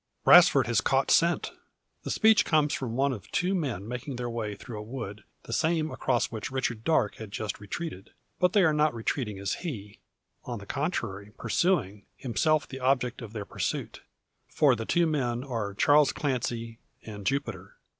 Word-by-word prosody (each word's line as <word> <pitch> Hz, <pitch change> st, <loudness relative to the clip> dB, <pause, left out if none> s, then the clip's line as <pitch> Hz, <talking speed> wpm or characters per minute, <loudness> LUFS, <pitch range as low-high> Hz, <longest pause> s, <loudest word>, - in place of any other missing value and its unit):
"Brasfort -, -, +8 dB
has -, -, +2 dB
caught -, -, +1 dB
scent!" -, -, +3 dB, 0.5 s
The -, -, -6 dB
speech 220 Hz, -1 st, +5 dB
comes 150 Hz, -2 st, +2 dB
from 120 Hz, -4 st, -3 dB
one 135 Hz, +1 st, +2 dB
of 105 Hz, -4 st, -9 dB
two 180 Hz, +2 st, 0 dB
men 130 Hz, -, -2 dB
making 125 Hz, +3 st, -5 dB
their 120 Hz, -1 st, -4 dB
way 110 Hz, -3 st, -3 dB
through 110 Hz, +1 st, -8 dB
a -, -, -5 dB
wood, 105 Hz, -3 st, -7 dB, 0.2 s
the 115 Hz, -, -6 dB
same 160 Hz, +2 st, +1 dB
across 125 Hz, -3 st, 0 dB
which 110 Hz, -2 st, -5 dB
Richard 125 Hz, -4 st, -2 dB
Darke 130 Hz, -9 st, +1 dB
has 110 Hz, -2 st, -8 dB
just 105 Hz, 0 st, -4 dB
retreated. 105 Hz, -, -6 dB, 0.3 s
But 180 Hz, 0 st, +3 dB
they 205 Hz, -, +5 dB
are 160 Hz, -3 st, +4 dB
not 150 Hz, -3 st, +2 dB
retreating 115 Hz, -2 st, -2 dB
as 95 Hz, -1 st, -2 dB
he; 105 Hz, -, -6 dB, 0.4 s
on -, -, -5 dB
the -, -, -10 dB
contrary 100 Hz, +2 st, -3 dB
pursuing, 105 Hz, -, 0 dB
himself 145 Hz, +3 st, +1 dB
the 135 Hz, -, -7 dB
object 130 Hz, -1 st, 0 dB
of 115 Hz, -2 st, -9 dB
their 105 Hz, -3 st, -5 dB
pursuit. -, -, -4 dB, 0.5 s
For 140 Hz, -4 st, +3 dB
they 115 Hz, -1 st, -5 dB
two 175 Hz, +7 st, +2 dB
men 125 Hz, -6 st, -1 dB
are 115 Hz, -7 st, -4 dB
Charles 145 Hz, +6 st, +5 dB
Clancy, 120 Hz, -4 st, -3 dB, 0.2 s
and 105 Hz, -2 st, -8 dB
Jupiter. 140 Hz, +7 st, -3 dB
120 Hz, 175 wpm, -28 LUFS, 105-150 Hz, 0.5 s, Brasfort